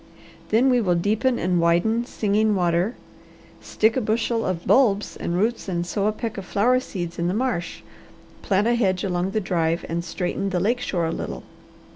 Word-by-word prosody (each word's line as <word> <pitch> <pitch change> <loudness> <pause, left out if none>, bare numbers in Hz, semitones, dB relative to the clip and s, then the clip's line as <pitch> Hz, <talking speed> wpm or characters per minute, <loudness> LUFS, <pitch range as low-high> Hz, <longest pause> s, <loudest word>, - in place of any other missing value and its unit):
Then 245 +5 +4
we 245 -1 +3
will 180 -5 +2
deepen 220 +8 +1
and 180 0 +1
widen 220 +8 +2
Singing 215 -1 +1
Water, 175 +4 +1 0.7
stick 220 +1 +1
a 260 - +1
bushel 225 +1 0
of 175 -2 -3
bulbs 210 -6 +3
and 170 - -3
roots 220 +1 -1
and 175 -1 -1
sow 200 +3 -1
a - - +2
peck 220 -1 -5
of 190 - -8
flower 245 +7 +2
seeds 175 -9 -6
in 170 - 0
the 180 - -1
marsh, 230 -7 -2 0.6
plant 200 +1 +1
a 235 - +3
hedge 190 -6 +1
along 180 -1 -1
the 215 - -1
drive, 170 -4 -1
and 170 +1 -2
straighten 180 +3 -3
the 185 -2 -1
lake 230 +7 +1
shore 175 -8 -1
a 160 - -1
little. - - -5
200 Hz, 190 wpm, -23 LUFS, 175-225 Hz, 0.7 s, Then